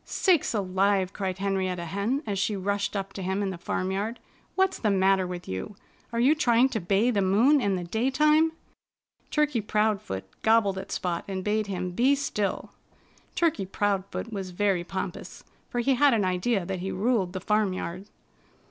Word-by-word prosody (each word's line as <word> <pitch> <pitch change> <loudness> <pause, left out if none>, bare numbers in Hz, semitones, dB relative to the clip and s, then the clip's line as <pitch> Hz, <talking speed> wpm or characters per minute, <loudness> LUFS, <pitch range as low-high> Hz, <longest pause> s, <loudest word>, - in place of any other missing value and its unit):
"Sakes 345 - +1
alive!" 190 -1 +1
cried 190 -2 -3
Henrietta 190 -3 -1
Hen 200 - -1
as 200 -3 -2
she 205 +2 0
rushed 200 +2 -2
up 195 0 -3
to 195 - -6
him 190 +2 -1
in 195 - -1
the 185 - -6
farmyard. 195 +7 -2 0.4
"What's 380 0 +1
the 215 - +1
matter 190 -1 +3
with 180 -1 -7
you? 95 - -5 0.4
Are 230 - -2
you 260 +5 +5
trying 255 -4 +3
to 225 - -2
bay 200 +6 +2
the 205 -4 +1
moon 230 +10 +4
in 200 -4 +1
the 180 - -3
daytime?" 300 - +2 0.8
Turkey 295 -6 +1
Proudfoot 210 - -1 0.2
gobbled 220 -4 +3
at 190 - -8
Spot 175 -2 -2
and 190 -1 -4
bade 210 +1 0
him 180 -2 -3
be 255 +9 +3
still. 210 -8 -2 0.6
Turkey 325 - +1
Proudfoot 200 +3 -2
was 195 -2 -4
very 185 -1 0
pompous, 185 0 -6 0.3
for 245 - -1
he 270 +3 +2
had 270 0 +4
an 205 -4 +1
idea 185 +2 0
that 190 0 -3
he 190 +2 -3
ruled 200 -3 0
the 185 - -3
farmyard. 190 -2 -1
200 Hz, 175 wpm, -27 LUFS, 185-230 Hz, 0.8 s, you